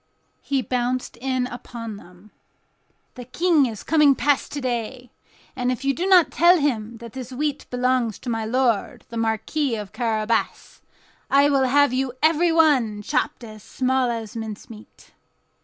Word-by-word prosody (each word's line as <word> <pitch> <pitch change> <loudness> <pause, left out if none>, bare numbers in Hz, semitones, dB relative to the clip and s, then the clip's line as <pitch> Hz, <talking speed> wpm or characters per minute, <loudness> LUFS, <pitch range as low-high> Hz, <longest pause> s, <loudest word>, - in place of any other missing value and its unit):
He 275 -2 -1
bounced 250 0 -2
in 255 0 -1
upon 235 -3 -8
them: 180 +2 -17 0.8
"The 250 - -9
King 310 +1 +2
is 220 -3 -7
coming 300 -3 +4
past 290 0 0
to 290 - -3
day, 245 -1 -4 0.4
and 250 -1 -1
if 255 +2 -4
you 275 - +2
do 350 +7 -2
not 360 -5 +5
tell 345 +2 +5
him 235 -7 -2
that 235 -1 -11
this 260 -1 -7
wheat 285 +2 -3
belongs 250 -3 0
to 250 - -6
my 225 -1 -2
lord 235 -2 0
the 230 - -7
Marquis 225 +5 -1
of 210 -2 -7
Carabas, 225 -1 -2 0.5
I 280 +1 +4
will 270 -2 +3
have 285 0 +3
you 260 -1 -1
everyone 310 -9 +3
chopped 240 - -2
as 215 -2 -10
small 260 +3 0
as 225 -2 -5
mincemeat." 220 0 -9
250 Hz, 155 wpm, -23 LUFS, 225-280 Hz, 0.8 s, not